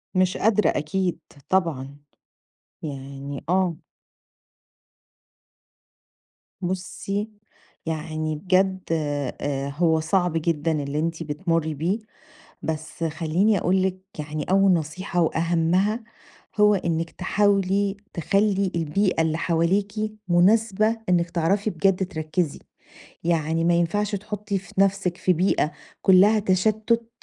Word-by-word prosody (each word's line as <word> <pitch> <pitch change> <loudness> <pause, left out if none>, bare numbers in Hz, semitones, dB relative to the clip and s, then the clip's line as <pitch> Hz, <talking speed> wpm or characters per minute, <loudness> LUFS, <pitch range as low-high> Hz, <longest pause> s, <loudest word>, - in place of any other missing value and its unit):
مش 185 0 +2
قادرة 210 -1 +3
أكيد 175 +4 -1 0.3
طبعًا، 145 -7 0 0.9
يعني 140 -1 -6
آه. 180 -2 +2 2.9
بُصّي، 195 +3 -3 0.6
يعني 155 -1 -3
بجد 190 +3 +2
آآ 145 -2 -2
هو 160 +2 +2
صعب 175 +2 +1
جدًا 165 -1 0
اللي 140 +2 -2
أنتِ 165 +1 -2
بتمُرّي 160 +1 -1
بيه، 170 +9 -1 0.6
بس 160 +1 -4
خلّيني 165 +6 +1
أقول 185 +2 +2
لِك 185 0 -1 0.2
يعني 150 0 -4
أول 195 0 +5
نصيحة 175 +2 -1
وأهمّها، 170 +7 +1 0.6
هو 210 0 +6
إنِّك 165 -3 -1
تحاولي 200 0 +1 0.2
تخلّي 195 +2 +1
البيئة 170 +2 +1
اللي 160 0 0
حواليكِ 175 +5 +1 0.4
مناسبة 215 +4 +3
إنِّك 175 -1 +2
تعرفي 190 +5 +1
بجد 190 +2 +1
تركِّزي. 155 -1 -2 0.7
يعني 165 -1 +1
ما 175 +1 +3
ينفعش 200 +5 +1
تحُطّي 210 0 -3
في 190 - -10
نَفْسِك 195 -2 +1
في 185 - +2
بيئة 170 -3 +1 0.3
كُلّها 195 +3 +6
تشتُّت 215 +4 +1
175 Hz, 105 wpm, -24 LUFS, 160-195 Hz, 2.9 s, هو